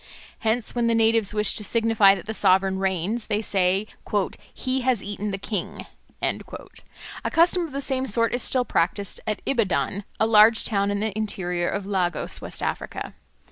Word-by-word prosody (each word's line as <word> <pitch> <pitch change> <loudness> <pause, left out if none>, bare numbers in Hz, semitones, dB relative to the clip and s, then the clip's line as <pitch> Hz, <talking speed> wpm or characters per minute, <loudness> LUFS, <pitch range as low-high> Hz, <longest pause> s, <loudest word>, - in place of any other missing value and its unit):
Hence, 225 0 0
when 240 -1 0
the 230 - +2
natives 225 -2 +3
wish 210 0 +3
to 210 - -2
signify 220 -2 +4
that 185 - -9
the 220 - -4
sovereign 190 -1 +2
reigns, 195 +4 -1
they 210 -1 0
say, 195 -1 +1 0.7
"He 260 0 -2
has 250 -4 +1
eaten 205 +1 -4
the 195 - -3
king." 195 -1 -5 0.4
A - - -6
custom 345 +1 +3
of - - -14
the 275 +1 -4
same 265 -1 -1
sort 230 +1 +1
is 245 - -1
still 250 +1 +1
practised 185 +2 -1
at 215 - -2
Ibadan, 205 -4 0 0.2
a - - +3
large 220 +1 +6
town 200 -2 0
in 205 0 -1
the 215 -2 -2
interior 180 -5 -2
of 200 -1 -3
Lagos, 180 -4 -2
West - - -6
Africa. - - -4
210 Hz, 175 wpm, -24 LUFS, 195-230 Hz, 0.7 s, large